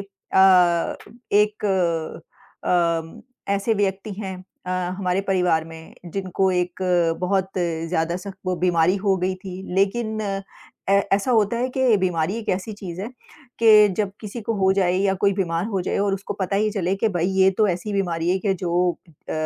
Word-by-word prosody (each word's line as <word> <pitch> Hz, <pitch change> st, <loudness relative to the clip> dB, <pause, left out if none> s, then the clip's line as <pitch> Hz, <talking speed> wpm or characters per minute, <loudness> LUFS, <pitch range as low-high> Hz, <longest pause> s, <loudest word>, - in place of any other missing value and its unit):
अ, 190 Hz, -3 st, +3 dB, 0.4 s
एक 210 Hz, +1 st, +2 dB, 1.0 s
अ, 170 Hz, -2 st, 0 dB, 0.3 s
ऐसे 210 Hz, +3 st, 0 dB
व्यक्ति 200 Hz, +1 st, -1 dB
हैं 190 Hz, -3 st, -5 dB, 0.3 s
अ, -, -, -3 dB, 0.3 s
हमारे 185 Hz, 0 st, 0 dB
परिवार 180 Hz, -5 st, +1 dB
में 160 Hz, 0 st, -12 dB, 0.2 s
जिनको 190 Hz, 0 st, 0 dB
एक 180 Hz, 0 st, -2 dB, 0.4 s
बहुत 190 Hz, +1 st, 0 dB
ज़्यादा 165 Hz, 0 st, -1 dB
सख्त 190 Hz, +1 st, -9 dB
वो 185 Hz, -, +1 dB
बीमारी 175 Hz, +1 st, +2 dB
हो 195 Hz, -1 st, +1 dB
गई 185 Hz, +1 st, -1 dB
थी। 185 Hz, 0 st, -8 dB
लेकिन 215 Hz, +3 st, 0 dB
अ, 195 Hz, -2 st, -3 dB, 0.7 s
ऐसा 200 Hz, +6 st, +2 dB
होता 220 Hz, -1 st, +2 dB
है 250 Hz, +2 st, 0 dB
कि 255 Hz, -4 st, +4 dB
बीमारी 180 Hz, -2 st, 0 dB
एक 225 Hz, -, -8 dB
ऐसी 190 Hz, +4 st, -3 dB
चीज 185 Hz, -4 st, -8 dB
है 205 Hz, -, -4 dB, 0.5 s
कि 215 Hz, -2 st, +7 dB
जब 205 Hz, -2 st, 0 dB
किसी 215 Hz, +2 st, -7 dB
को 230 Hz, +1 st, -2 dB
हो 190 Hz, 0 st, +4 dB
जाए 185 Hz, -2 st, +2 dB
या 195 Hz, 0 st, +2 dB
कोई 200 Hz, -1 st, +3 dB
बीमार 175 Hz, -2 st, -1 dB
हो 195 Hz, -4 st, -2 dB
जाए -, -, -1 dB
और 200 Hz, -1 st, +1 dB
उसको 195 Hz, +1 st, -5 dB
पता 195 Hz, +1 st, 0 dB
ही 215 Hz, +1 st, +1 dB
चले 190 Hz, -3 st, -1 dB
कि 220 Hz, +3 st, +1 dB
भाई 175 Hz, -4 st, -1 dB
ये 190 Hz, 0 st, +6 dB
तो 215 Hz, -, +5 dB
ऐसी 185 Hz, +4 st, -2 dB
बीमारी 175 Hz, -4 st, -1 dB
है 190 Hz, -, +2 dB
कि 195 Hz, 0 st, 0 dB
जो 175 Hz, 0 st, +1 dB, 0.4 s
अ, -, -, -1 dB
190 Hz, 175 wpm, -23 LUFS, 180-200 Hz, 1.0 s, कि